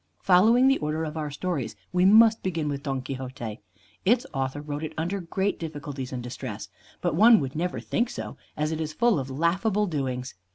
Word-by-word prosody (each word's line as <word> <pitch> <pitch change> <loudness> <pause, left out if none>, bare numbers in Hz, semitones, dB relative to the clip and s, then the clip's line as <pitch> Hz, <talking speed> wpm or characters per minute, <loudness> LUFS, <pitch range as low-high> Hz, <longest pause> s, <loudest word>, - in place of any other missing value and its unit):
Following 225 +8 +5
the 270 - +4
order 155 +2 -2
of 155 -1 -4
our 155 -2 -3
stories 145 -7 -3 0.2
we 180 0 +3
must 220 +2 +7
begin 165 -5 -2
with 140 -1 -3
"Don 135 -3 -3
Quixote." 130 -4 -6 0.4
Its 235 +5 +3
author 135 +1 -2
wrote 145 +1 -5
it 155 - -4
under 175 +5 -2
great 190 +4 -1
difficulties 145 -5 -6
and 125 -2 -4
distress; 120 - -6 0.3
but - - 0
one 220 +6 +7
would 135 0 -4
never 175 +3 -2
think 235 0 -1
so, - - -6 0.2
as 150 +1 0
it 160 0 -2
is 155 -1 -3
full 235 -5 +3
of 135 0 -5
laughable 185 +9 +1
doings. 130 -6 -3
155 Hz, 195 wpm, -26 LUFS, 135-190 Hz, 0.4 s, must